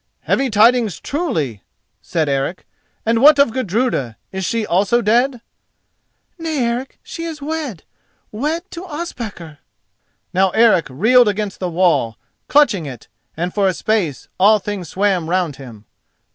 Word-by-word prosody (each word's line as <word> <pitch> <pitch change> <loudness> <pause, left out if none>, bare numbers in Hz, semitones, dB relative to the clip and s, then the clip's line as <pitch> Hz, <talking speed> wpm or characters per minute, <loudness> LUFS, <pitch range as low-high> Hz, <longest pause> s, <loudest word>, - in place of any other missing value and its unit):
"Heavy 270 0 0
tidings, 225 -1 +3
truly!" 155 - -2 0.4
said 160 -2 -1
Eric; 140 +5 -2 0.4
"and 230 +1 +2
what 295 +1 +8
of 280 -4 +4
Gudruda, 215 - -1
is 190 0 -4
she 225 +3 -1
also 200 +6 +2
dead?" 240 +3 +2 1.0
"Nay, 325 -2 -3
Eric 240 +3 -3
she 330 - -7
is 320 -2 -6
wed—wed 295 - -5
to 340 - -7
Ospakar." 235 - -7 0.7
Now 190 +1 +3
Eric 225 -7 +5
reeled 225 - +4
against 205 -1 -2
the 180 - -2
wall, 165 - +1 0.3
clutching 235 - +3
it, 125 -5 -10 0.3
and 175 +2 -2
for 200 -2 +2
a 185 - 0
space 195 -11 -1
all 210 +3 +6
things 200 -3 -5
swam 190 -4 0
round 175 -5 0
him. 115 -6 -12
210 Hz, 135 wpm, -19 LUFS, 175-255 Hz, 1.0 s, what